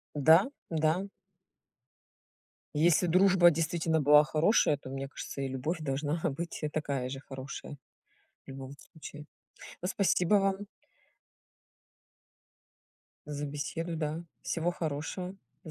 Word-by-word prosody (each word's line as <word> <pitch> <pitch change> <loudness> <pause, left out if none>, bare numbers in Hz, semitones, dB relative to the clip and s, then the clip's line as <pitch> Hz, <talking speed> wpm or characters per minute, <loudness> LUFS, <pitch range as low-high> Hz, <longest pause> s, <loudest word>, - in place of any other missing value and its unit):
Да, 160 +6 +6 0.2
да. 160 +4 +1 1.7
Если 165 +3 +4
дружба 180 0 +6
действительно 160 0 0
была 150 +1 +7
хорошая, 155 +1 +3
то 135 - -10
мне 135 +1 -4
кажется, 140 0 -6
и 135 - -1
любовь 135 +6 -3
должна 145 +2 -1
быть, 165 +5 -6
э, 150 - -1
такая 140 -4 -2
же 135 0 -6
хорошая. 135 +1 -8 0.7
В - - -33
любом 135 0 -8 0.2
случае. 150 -2 -10 0.6
Ну, 180 - -1
спасибо 190 -1 +2
вам 195 -1 +2 2.7
за 145 0 -4
беседу, 165 +4 -4
да. 155 +2 -3 0.2
Всего 170 +1 -1
хорошего. 170 +4 -4 0.3
До 160 - -8
155 Hz, 115 wpm, -30 LUFS, 145-170 Hz, 2.7 s, была